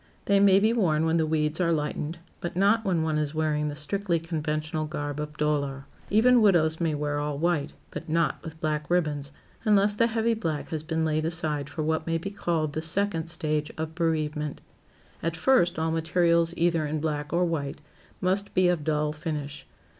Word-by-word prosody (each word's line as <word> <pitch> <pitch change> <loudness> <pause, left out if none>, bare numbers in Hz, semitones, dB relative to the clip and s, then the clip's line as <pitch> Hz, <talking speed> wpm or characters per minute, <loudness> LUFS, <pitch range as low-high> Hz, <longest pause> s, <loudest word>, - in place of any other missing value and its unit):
They 200 0 +4
may 195 -1 +6
be 220 +3 +3
worn 165 -9 +2
when 165 +1 +2
the 160 -1 +1
weeds 155 +1 0
are 170 -1 +2
lightened, 150 +1 -2 0.2
but 170 - -5
not 205 +4 +3
when 180 -6 +1
one 155 -1 0
is 150 0 -2
wearing 150 -1 0
the 145 - -4
strictly 170 +4 -1
conventional 155 -1 -2
garb 145 -1 -4
of 150 0 -5
dolor. 140 -2 -1 0.2
Even 240 +3 +5
widows 170 -6 +3
may 160 -2 +1
wear 145 0 -1
all 145 -1 -2
white, 165 -2 0 0.2
but - - -7
not 165 +1 +1
with 160 -1 -9
black 150 -1 -2
ribbons, 150 -5 0 0.3
unless 205 -2 +4
the 230 +3 +3
heavy 230 0 +1
black 165 -9 -3
has 160 -2 -3
been 160 0 -1
laid 155 0 0
aside 155 -4 -2
for 155 - -4
what 160 +1 -1
may 165 0 +1
be 195 +4 -5
called 165 -7 -1
the 155 - -2
"second 165 0 0
stage" 155 -3 -1
of 160 0 -4
bereavement. 155 -3 -1 0.6
At 165 0 -2
first, 175 -5 +3
all 160 0 0
materials 170 +1 +2
either 170 -2 +2
in 155 +1 -2
black 150 -1 -2
or 175 +1 +2
white, 145 -5 -2 0.4
must 190 +2 0
be 185 -1 +4
of 175 -4 0
dull 150 0 0
finish. 150 -3 -5
160 Hz, 190 wpm, -27 LUFS, 150-175 Hz, 0.6 s, may